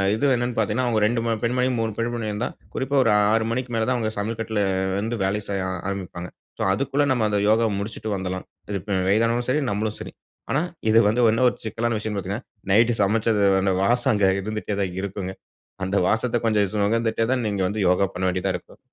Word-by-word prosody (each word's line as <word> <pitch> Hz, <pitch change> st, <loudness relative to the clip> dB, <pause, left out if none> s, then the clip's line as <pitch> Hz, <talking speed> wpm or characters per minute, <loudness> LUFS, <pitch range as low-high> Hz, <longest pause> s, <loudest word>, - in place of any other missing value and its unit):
இது 135 Hz, +5 st, +2 dB
என்னனு 120 Hz, 0 st, -2 dB
பாத்தீங்கன்னா, 110 Hz, +4 st, +1 dB
அவுங்க 110 Hz, -2 st, +1 dB
2 115 Hz, +1 st, 0 dB
ம 115 Hz, -, +1 dB
பெண்மணி, 125 Hz, +2 st, +1 dB
3 110 Hz, 0 st, 0 dB
பெண்மணி 115 Hz, -1 st, -2 dB
இருந்தா, 105 Hz, +4 st, -2 dB, 0.3 s
குறிப்பா 135 Hz, +2 st, -1 dB
ஒரு 115 Hz, -, +3 dB, 0.2 s
6 110 Hz, 0 st, +2 dB
மணிக்கு 125 Hz, +1 st, -3 dB
மேல 110 Hz, -1 st, +1 dB
தான் 130 Hz, -, +2 dB
அவுங்க 110 Hz, -2 st, -1 dB
சமையல் 110 Hz, +2 st, -3 dB
கட்ல 110 Hz, -2 st, -1 dB, 0.4 s
வந்து 115 Hz, +3 st, -2 dB
வேலை 100 Hz, +2 st, 0 dB
செய்ய 95 Hz, -2 st, -1 dB, 0.2 s
ஆரம்பிப்பாங்க. 90 Hz, -2 st, -5 dB, 0.3 s
சோ, -, -, 0 dB
அதுக்குள்ள 140 Hz, +6 st, +1 dB
நம்ம 120 Hz, -4 st, +1 dB
அந்த 105 Hz, -1 st, +1 dB
யோகாவ 110 Hz, +1 st, +3 dB
முடிச்சுட்டு 110 Hz, +1 st, -5 dB
வந்துடலாம். 95 Hz, -1 st, -4 dB, 0.3 s
இப்ப 100 Hz, +1 st, -2 dB
வயதானவங்களும் 115 Hz, +4 st, +2 dB
சரி, 150 Hz, +4 st, +2 dB
நம்மளும் 105 Hz, +1 st, -2 dB
சரி. -, -, -7 dB, 0.4 s
ஆனா, 140 Hz, -, +2 dB, 0.3 s
இது 110 Hz, +1 st, +6 dB
வந்து 120 Hz, +3 st, +1 dB
இன்னும் 125 Hz, +3 st, +3 dB
ஒரு -, -, -9 dB
சிக்கலான 115 Hz, +1 st, -1 dB
விஷயம்னு 105 Hz, -1 st, -3 dB
பாத்தீங்கன்னா, 100 Hz, +6 st, -5 dB, 0.3 s
நைட்டு 115 Hz, +3 st, +4 dB
சமச்சது 105 Hz, 0 st, +2 dB, 0.2 s
அந்த 95 Hz, 0 st, +2 dB
வாசம் 120 Hz, +5 st, +2 dB
அங்க 105 Hz, -2 st, +3 dB
இருந்துட்டே 110 Hz, 0 st, -3 dB
தான் 90 Hz, -1 st, -3 dB
இருக்குங்க. 95 Hz, -1 st, -4 dB, 0.5 s
அந்த 95 Hz, +2 st, 0 dB
வாசத்த 120 Hz, +2 st, +1 dB
கொஞ்சம் 105 Hz, -2 st, +3 dB
சு -, -, -1 dB
நுகர்ந்துட்டே 115 Hz, +2 st, +1 dB
தான் 125 Hz, -2 st, +1 dB
நீங்க 100 Hz, -2 st, -1 dB
வந்து 105 Hz, +3 st, -3 dB
யோகா 90 Hz, +2 st, +3 dB
பண்ண 90 Hz, -, -4 dB
வேண்டியதா 95 Hz, +1 st, -1 dB
இருக்கும். 90 Hz, -, -10 dB
110 Hz, 200 wpm, -23 LUFS, 100-120 Hz, 0.5 s, இது